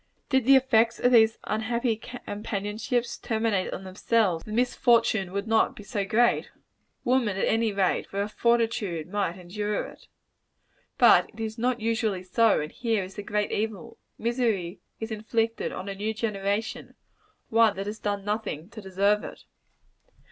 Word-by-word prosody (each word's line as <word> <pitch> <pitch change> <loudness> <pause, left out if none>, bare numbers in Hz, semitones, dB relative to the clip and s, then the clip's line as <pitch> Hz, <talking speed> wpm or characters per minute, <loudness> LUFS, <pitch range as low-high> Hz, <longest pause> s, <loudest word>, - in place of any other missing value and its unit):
Did 265 -4 +2
the 275 +1 +7
effects 230 -3 +3
of 245 - +3
these 225 -2 +5
unhappy 225 +2 -1
companionships 220 0 -4
terminate 220 -4 0
on 195 - -6
themselves, 190 -2 0
the 215 - -10
misfortune 235 -4 +2
would 200 +1 -3
not 225 0 +2
be 210 - -10
so 205 -1 -2
great. 235 +4 +2 0.5
Woman, 240 -6 +1
at - - +1
any 225 -1 +1
rate, 195 -2 0
with 195 - -3
her 200 - 0
fortitude, 225 -7 0
might 190 -2 -2
endure 205 +4 -3
it. - - -14 0.9
But - - +6
it 225 - -16
is 220 0 -4
not 245 0 0
usually 220 -4 0
so; 220 +3 +3
and 150 - -5
here 225 -4 -1
is 185 +1 -9
the 205 - -6
great 210 0 -1
evil. 210 -4 -4 0.2
Misery 220 -7 -1 0.2
is 220 0 -5
inflicted 225 +1 -1
on 190 - -6
a 200 - -3
new 210 +3 -3
generation; 210 0 -2 0.5
one 225 -2 +4
that 195 +1 -4
has 210 +2 -5
done 205 -1 -2
nothing 205 -6 -3
to 230 -1 -10
deserve 200 +2 +1
it. - - -9
215 Hz, 160 wpm, -26 LUFS, 200-230 Hz, 0.9 s, the